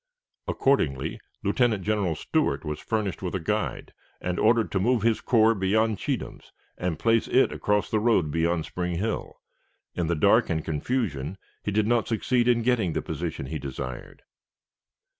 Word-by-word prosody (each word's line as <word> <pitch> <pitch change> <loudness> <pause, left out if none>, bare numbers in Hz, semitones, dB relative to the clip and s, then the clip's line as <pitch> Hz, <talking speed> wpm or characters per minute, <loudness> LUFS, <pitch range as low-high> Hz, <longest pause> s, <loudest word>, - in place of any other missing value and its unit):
Accordingly, 75 - +1 0.2
Lieutenant 110 -1 +1
General 100 -5 0
Stewart - - 0
was 75 0 -3
furnished 105 -6 -2
with - - -3
a - - 0
guide, - - -2 0.3
and 90 0 -2
ordered 115 0 +3
to 95 - +1
move 115 +2 +2
his 115 -1 +2
corps 115 -1 +4
beyond 110 +2 +1
Cheatham's, - - -4 0.2
and 90 -3 -2
place 115 +4 +2
it 130 - +3
across 105 0 0
the 110 - +2
road 105 -9 +2
beyond 80 +1 0
Spring 90 -1 -3
Hill. 110 +6 -3 0.6
In 85 -2 -1
the 85 - +1
dark 75 - +4
and 80 -2 -1
confusion, 80 - -2 0.2
he - - -3
did 105 +1 +2
not 120 0 +2
succeed 120 +2 +1
in 120 -1 +3
getting 115 -9 +1
the - - -2
position - - -4
desired. 65 -2 -7
105 Hz, 160 wpm, -26 LUFS, 85-115 Hz, 0.6 s, corps